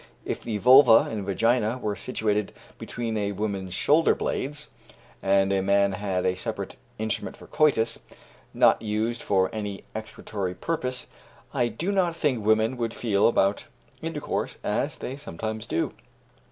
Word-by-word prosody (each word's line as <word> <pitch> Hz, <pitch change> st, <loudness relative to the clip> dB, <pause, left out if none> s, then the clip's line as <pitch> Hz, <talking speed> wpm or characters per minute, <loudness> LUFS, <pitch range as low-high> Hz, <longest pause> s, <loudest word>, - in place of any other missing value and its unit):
If -, -, -3 dB
the 110 Hz, -3 st, -3 dB
vulva 125 Hz, +1 st, +7 dB
and 105 Hz, -3 st, -3 dB
vagina 115 Hz, +4 st, +1 dB
were 105 Hz, -4 st, -2 dB
situated 105 Hz, -4 st, -1 dB, 0.3 s
between 115 Hz, -2 st, -4 dB
a 100 Hz, -1 st, -1 dB
woman's 100 Hz, -3 st, -3 dB
shoulder 155 Hz, -, +4 dB
blades, 150 Hz, +2 st, -3 dB, 0.5 s
and 95 Hz, 0 st, +3 dB
a 95 Hz, -, +2 dB
man 100 Hz, +1 st, +3 dB
had 95 Hz, -1 st, -2 dB
a 90 Hz, -, +3 dB
separate 100 Hz, +1 st, -5 dB, 0.2 s
instrument 110 Hz, 0 st, -3 dB
for -, -, -13 dB
coitus, 125 Hz, -7 st, +2 dB, 0.5 s
not -, -, +4 dB
used 110 Hz, +2 st, -1 dB
for 95 Hz, -2 st, +1 dB
any 105 Hz, -2 st, -4 dB
excretory 100 Hz, -3 st, -5 dB
purpose, 130 Hz, -, -2 dB, 0.5 s
I 120 Hz, -, +2 dB
do 155 Hz, -, -2 dB
not 180 Hz, -4 st, +1 dB
think 140 Hz, -9 st, 0 dB
women 110 Hz, +3 st, +2 dB
would 115 Hz, -1 st, -2 dB
feel 105 Hz, -4 st, +2 dB
about 100 Hz, -3 st, +2 dB, 0.4 s
intercourse -, -, -3 dB
as -, -, -1 dB
they 130 Hz, -, -5 dB
sometimes 110 Hz, -, -5 dB
do. 85 Hz, -, -1 dB
110 Hz, 145 wpm, -26 LUFS, 100-120 Hz, 0.5 s, vulva